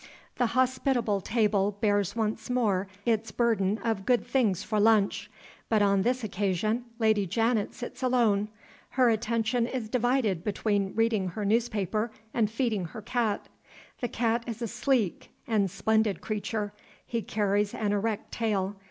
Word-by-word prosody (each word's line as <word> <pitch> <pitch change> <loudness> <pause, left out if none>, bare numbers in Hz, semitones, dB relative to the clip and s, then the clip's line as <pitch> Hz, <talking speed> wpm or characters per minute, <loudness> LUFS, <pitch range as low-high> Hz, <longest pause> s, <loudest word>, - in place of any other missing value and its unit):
The 245 - +2
hospitable 255 -5 +1
table 205 -2 +1
bears 205 -2 +1
once 220 0 -2
more 210 -6 +1 0.2
its 225 -1 +1
burden 215 -4 +1
of 225 -4 -1
good 245 +3 +2
things 210 -9 +1
for 215 -1 -1
lunch. 210 -1 +3 0.4
But 215 -2 +3
on 200 -1 +3
this 250 +4 0
occasion 210 +3 -1
Lady 220 -4 +2
Janet 225 +2 0
sits 250 +1 -7
alone. 235 -5 +2 0.5
Her 250 -2 +5
attention 230 +1 0
is 245 -4 -4
divided 245 -7 +1
between 200 -1 -1
reading 225 -4 +2
her 205 +4 -4
newspaper 215 0 0 0.2
and 220 -3 +2
feeding 225 -5 -1
her 190 +6 -8
cat. 225 -2 -1 0.5
The 245 - -1
cat 230 0 0
is 230 -2 -5
a - - -1
sleek 225 -3 0 0.2
and 210 -4 +1
splendid 215 +2 +1
creature. 210 -1 -3 0.3
He 230 -1 -2
carries 205 -1 0
an 210 -2 -1
erect 215 +1 -2
tail. 205 -3 -1
220 Hz, 145 wpm, -28 LUFS, 205-235 Hz, 0.5 s, Her